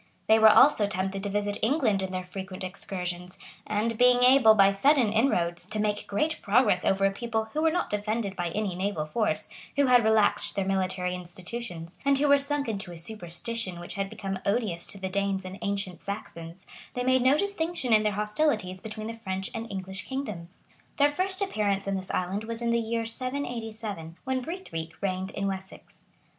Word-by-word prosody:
They 220 0 +5
were 220 0 +9
also 215 -2 +6
tempted 195 0 -2
to 200 - -3
visit 205 0 -1
England 225 -6 +2
in 190 - -2
their 185 0 -3
frequent 185 +1 -7
excursions; 180 -1 -5 0.3
and 215 +2 -1
being 250 0 +5
able, 250 -4 +7
by 195 -1 +6
sudden 240 +1 +3
inroads, 175 -7 +1
to 215 +1 -3
make 210 -1 -1
great 305 +10 -1
progress 205 -4 +3
over 195 0 +2
a 195 - +3
people 220 +1 -2
who 310 - 0
were 320 - +4
not 350 +2 -1
defended 210 -1 -2
by 175 -2 -2
any 200 +1 -2
naval 185 -3 -2
force, 215 +8 0 0.3
who 285 - +4
had 250 -2 +5
relaxed 220 -1 +3
their 195 - 0
military 185 -1 -1
institutions, 180 0 -6
and 280 0 +3
who 290 +2 +2
were 285 0 +6
sunk 280 0 -1
into 195 -5 -3
a 170 - -8
superstition 180 +2 -4
which 175 - -7
had 195 -1 -2
become 195 -3 -4
odious 200 -5 -1
to - - -4
the 190 -1 -4
Danes 195 0 -1
and 185 +1 -7
ancient 200 -3 -3
Saxons, 175 -3 -7 0.3
they 250 - -1
made 260 0 +3
no 260 +4 +5
distinction 335 - -1
in 215 - +6
their 210 -1 +1
hostilities 210 -3 0
between 215 0 -6
the 225 - -4
French 190 -4 -4
and 230 0 -5
English 190 0 -4
kingdoms. 210 -10 -6 0.3
Their 285 0 +5
first 375 +6 -1
appearance 205 - 0
in 195 - -1
this 190 -1 -4
island 190 +4 -2
was 230 +1 -4
in 235 - +1
the 235 - +3
year 230 0 -2
787,[] 225 - -4
when 260 -1 -1
Brithric 205 - -6
reigned 190 -1 -2
in 195 - -3
Wessex. 190 -1 -7
205 Hz, 190 wpm, -27 LUFS, 190-235 Hz, 0.3 s, were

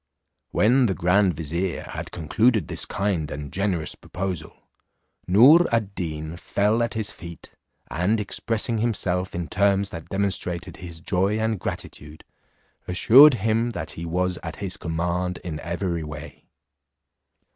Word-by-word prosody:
When 125 +4 +3
the 95 - -1
grand 90 +2 +3
vizier 85 +4 -3
had - - -7
concluded 105 +4 +1
this - - -1
kind 95 -7 -1
and 70 -1 -7
generous 95 -5 -1
proposal, 90 -4 -5 0.7
Noor 135 - +7
ad 110 -4 0
Deen 80 -2 -5
fell 105 +6 +1
at 115 0 -1
his 110 -2 -2
feet, 85 0 -11 0.4
and 90 - 0
expressing 115 +2 -2
himself 95 -6 -1
in 85 -1 -3
terms 100 +2 +1
that 80 -2 -8
demonstrated 95 -3 -2
his 85 -3 -9
joy 95 +4 0
and 110 -2 -1
gratitude, 75 -2 -7 0.6
assured 125 +10 +7
him, 115 +2 +2
that 80 -2 -4
he 85 +1 -6
was 90 +1 -1
at - - -6
his 95 -1 -3
command 90 0 -2
in 80 -4 -5
every 85 0 -3
way. 75 -1 -9
90 Hz, 135 wpm, -24 LUFS, 85-105 Hz, 0.7 s, Noor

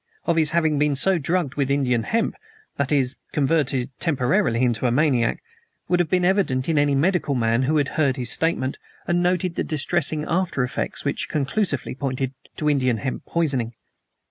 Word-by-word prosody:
Of 170 - +2
his 160 -2 +4
having 160 -3 +1
been 150 -1 +2
so 185 +6 +3
drugged 160 -2 -1
with 140 -2 -1
Indian 130 -4 +1
hemp 225 - 0 0.4
that 140 0 -1
is, 135 -2 +1 0.2
converted 140 -3 +1
temporarily 130 - +1
into 120 0 +1
a - - +1
maniac 125 -3 +1 0.4
would 180 - +2
have 175 - +1
been 180 -1 +2
evident 175 -10 +1
to 165 - 0
any 145 -1 +3
medical 155 -1 +1
man 115 0 +1
who 150 +4 +1
had 145 -2 +1
heard 140 -3 +1
his 125 -2 -2
statement 160 -5 -1 0.3
and 175 0 +2
noted 180 0 +1
the - - -2
distressing 155 0 0
after 170 -6 0
effects 125 - -3
which - - -1
conclusively 150 - -1
pointed 130 0 -3 0.2
to 150 - -1
Indian 130 -5 +2
hemp 125 +5 -5
poisoning. 135 -9 -1
145 Hz, 175 wpm, -23 LUFS, 130-165 Hz, 0.4 s, his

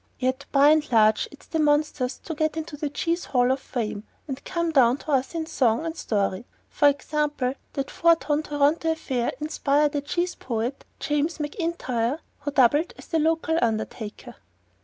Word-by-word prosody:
Yet 260 +2 -1
by 280 +1 +6
and 305 -2 +3
large 215 -2 +4
it's 285 - -16
the 320 - -2
monsters 295 -3 +1
that 325 - -4
get 310 +1 0
into 315 -1 -5
the 295 0 -3
Cheese 335 +4 -1
Hall 250 -1 +2
of 265 - 0
Fame 215 -6 -4 0.2
and 270 -1 -6
come 340 -2 -1
down 255 -4 +4
to 305 - -6
us 270 +3 +1
in 325 -1 -2
song 245 -2 +1
and 325 0 -3
story. 200 - -1 0.2
For 290 - +4
example, 285 -2 0 0.2
that 275 -1 -3
four 335 0 +4
ton 300 -2 -1
Toronto 295 +2 +1
affair 260 -6 -2
inspired 295 -1 +1
a 290 - 0
cheese 345 +5 -1
poet, 240 +2 -4
James 295 +4 0
McIntyre, 295 - -2 0.2
who 290 0 -3
doubled 290 +4 +3
as - - -13
the 325 - +1
local 325 +1 +1
undertaker. 220 -1 -3
290 Hz, 175 wpm, -25 LUFS, 255-315 Hz, 0.2 s, by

